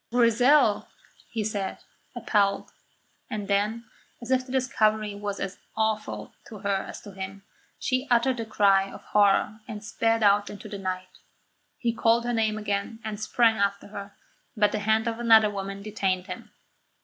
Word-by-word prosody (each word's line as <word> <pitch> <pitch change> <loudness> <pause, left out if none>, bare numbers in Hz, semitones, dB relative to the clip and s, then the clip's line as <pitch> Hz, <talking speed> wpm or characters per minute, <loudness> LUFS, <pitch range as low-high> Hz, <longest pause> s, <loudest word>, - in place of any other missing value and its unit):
"Grizel!" 245 0 +4 0.4
he 225 -2 -2
said, 205 -2 -3 0.4
appalled; 200 -2 +1 0.6
and 205 -2 -4
then, 210 +3 0 0.3
as 240 +2 -7
if 260 0 +3
the - - -8
discovery 215 -5 +1
was 205 0 -4
as 195 -1 -5 0.2
awful 220 -1 -1
to 215 - -9
her 200 -1 +1
as - - -8
to 205 - -11
him, 195 +1 -7 0.3
she 255 +1 -1
uttered 245 +1 +3
a 225 - -2
cry 195 -2 +3
of - - -11
horror 205 +1 +3
and 210 -3 -7
sped 225 0 +1
out 205 0 +4
into 210 +1 -9
the 205 -1 -6
night. 185 -1 -5 0.6
He 235 -2 0
called 230 +1 +2
her 240 - 0
name 220 -2 +1
again, 205 +1 -2
and 215 -1 -5
sprang 225 +1 +3
after 200 0 -1
her; 200 -1 -8 0.4
but 210 -1 +4
the 215 - -1
hand 220 +2 +1
of 230 0 -2
another 225 -3 +6
woman 195 0 -5
detained 195 -3 -1
him. - - -8
215 Hz, 165 wpm, -26 LUFS, 200-230 Hz, 0.6 s, another